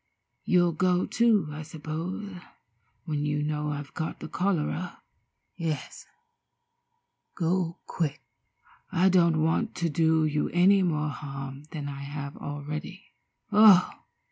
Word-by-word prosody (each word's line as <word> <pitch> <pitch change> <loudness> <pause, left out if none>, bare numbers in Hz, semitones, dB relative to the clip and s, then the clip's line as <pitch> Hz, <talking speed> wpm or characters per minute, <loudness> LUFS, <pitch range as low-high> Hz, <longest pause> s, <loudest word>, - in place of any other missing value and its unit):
You'll 175 -2 +4
go, 180 +2 +1
too, 220 -9 +2
I 150 +1 -6
suppose, 165 +5 -6 0.6
when 150 -3 -2
you 150 0 0
know 150 0 -2
I've 145 -1 -6
got 160 - -4
the - - -6
cholera. 180 -1 -2 0.5
Yes, 160 -6 -4 1.3
go 175 0 0
quick. 150 -5 -2 0.7
I 185 +3 +4
don't 170 -4 +4
want 165 +8 0
to 170 -1 -1
do 160 +1 +3
you 150 -1 0
any 190 +3 +5
more 150 -4 0
harm 135 -1 -7
than 150 -3 -5
I 140 -1 -6
have 140 0 -6
already. 150 +6 -7 0.4
Oh!" 210 -3 +7
160 Hz, 120 wpm, -27 LUFS, 150-180 Hz, 1.3 s, Oh